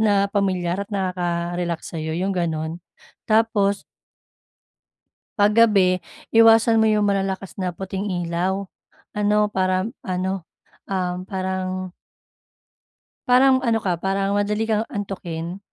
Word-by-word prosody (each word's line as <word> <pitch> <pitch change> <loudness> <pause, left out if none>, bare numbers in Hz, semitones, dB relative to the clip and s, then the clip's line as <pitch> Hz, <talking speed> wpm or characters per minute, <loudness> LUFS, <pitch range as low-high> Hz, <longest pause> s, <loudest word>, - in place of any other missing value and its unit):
na 205 -2 +3
pamilyar 185 -2 0
at 200 - -5
nakaka-relax 175 -3 -2
sayo 160 0 -3
yung 190 +2 -1
ganun, 165 -1 -2 0.5
tapos 215 -2 +2 1.5
Pag 205 +1 +4
gabi 195 -5 +4 0.3
iwasan 225 0 +6
mo 220 - +4
yung 210 -1 +2
malalakas 195 -1 -2
na 185 -1 -1
puting 195 +2 -4 0.2
ilaw 185 +4 -1 0.5
ano 210 0 +2
parang 185 +3 0
ano, 185 -1 -2 0.4
ah, 180 -2 -1
parang 185 -1 -3 1.4
parang 260 +1 +5
ano 230 -3 +2
ka, 175 -3 -1
parang 195 +1 0
madali 210 +2 0
kang 220 +1 +1
antukin 185 - -5
195 Hz, 110 wpm, -22 LUFS, 180-210 Hz, 1.5 s, iwasan